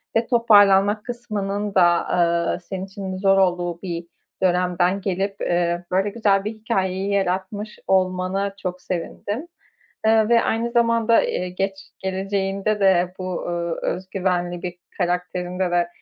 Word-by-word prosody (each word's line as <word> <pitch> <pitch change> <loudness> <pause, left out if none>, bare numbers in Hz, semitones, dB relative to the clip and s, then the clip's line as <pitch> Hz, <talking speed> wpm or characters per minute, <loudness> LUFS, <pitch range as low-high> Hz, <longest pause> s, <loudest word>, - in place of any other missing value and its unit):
ve 230 +1 +2
toparlanmak 205 -3 +5
kısmının 210 -4 -3
da, 175 -2 +4
ııı, 170 0 +1
senin 190 +1 -6
için 195 -1 -6
zor 195 0 +3
olduğu 175 -2 +1
bir 170 -2 -5 0.4
dönemden 180 +1 +2
gelip, 195 +1 -2
eee, 175 0 0
böyle 195 +3 +2
güzel 200 -2 +2
bir 215 - -1
hikâyeyi 195 -3 -2
yaratmış 195 +2 -2
olmana 185 +1 +1
çok 180 -2 -5
sevindim, 205 - -4 0.6
eee, 220 0 +4
ve 235 -1 +5
aynı 230 +1 0
zamanda, 230 -1 +3
eee, 180 - -2
geç 195 +1 -4
geleceğinde 195 +2 -1
de 180 -2 +3
bu, 185 -1 -3
ııı, 170 -1 -2
özgüvenli 180 -2 -2
bir 180 -1 -4 0.2
karakterinde 180 0 -1
de, 175 0 +2
190 Hz, 130 wpm, -22 LUFS, 180-205 Hz, 0.6 s, toparlanmak